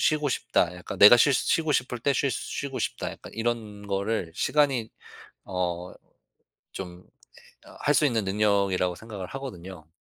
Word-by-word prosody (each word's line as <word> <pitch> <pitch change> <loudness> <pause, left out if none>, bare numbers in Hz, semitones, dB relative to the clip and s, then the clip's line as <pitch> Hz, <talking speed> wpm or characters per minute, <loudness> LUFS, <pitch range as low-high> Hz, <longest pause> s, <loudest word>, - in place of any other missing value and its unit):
쉬고 150 -1 -2
싶다. 90 -8 0
약간 90 - -8
내가 105 +4 +10
쉴 140 +3 +4
쉬고 160 +4 +1
싶을 125 -2 -1
때 140 +4 +1
쉴 140 +2 +1
쉬고 140 -2 -4
싶다.' - - -3
약간 - - -12
이런 110 -3 -3
거를 100 -3 -1
시간이 135 -7 +1 0.6
어 90 -1 -3 0.8
좀 90 -2 -7
에 - - -30 0.4
어 - - -15
할 145 - +2
수 150 - +4
있는 115 -6 0
능력이라고 100 -3 +1
생각을 105 -4 -8
하거든요. 95 - -8
105 Hz, 290 characters per minute, -26 LUFS, 95-130 Hz, 0.8 s, 내가